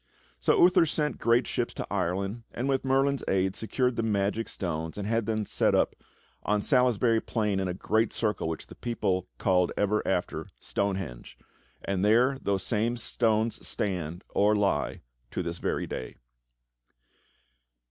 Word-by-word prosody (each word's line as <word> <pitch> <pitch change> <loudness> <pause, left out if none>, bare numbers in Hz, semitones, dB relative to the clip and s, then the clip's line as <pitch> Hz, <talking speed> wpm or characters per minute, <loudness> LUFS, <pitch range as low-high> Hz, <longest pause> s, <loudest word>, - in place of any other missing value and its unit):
So - - +3
Uther 175 -2 +6
sent 150 0 -1
great 115 +1 +3
ships - - -2
to - - -4
Ireland, 95 +6 -1
and 125 - -2
with 135 -1 +1
Merlin's 135 +1 +2
aid 95 0 +1
secured 125 +2 0
the - - +2
magic 105 0 0
stones 80 -3 -4
and 100 - -3
had 115 -1 0
them 110 -1 0
set - - +2
up - - +2 0.5
on 105 0 0
Salisbury 125 -4 +3
Plain 105 -4 0
in 95 - -1
a 90 - -3
great 110 +4 +1
circle 105 -6 -1
which 80 -1 -4
the - - -12
people 95 -6 -1
called 90 +3 +2
ever 105 +1 +2
after - - -1
"Stonehenge," 95 -11 -3 0.5
and 95 -1 -1
there 125 +6 +4
those 100 -2 0
same 115 +2 0
stones 110 -1 0
stand, 90 -3 -2
or 105 +1 +3
lie, 100 -1 0 0.3
to 90 - -3
this 85 0 -4
very - - -1
day. 65 - -6
105 Hz, 155 wpm, -28 LUFS, 95-115 Hz, 0.5 s, Uther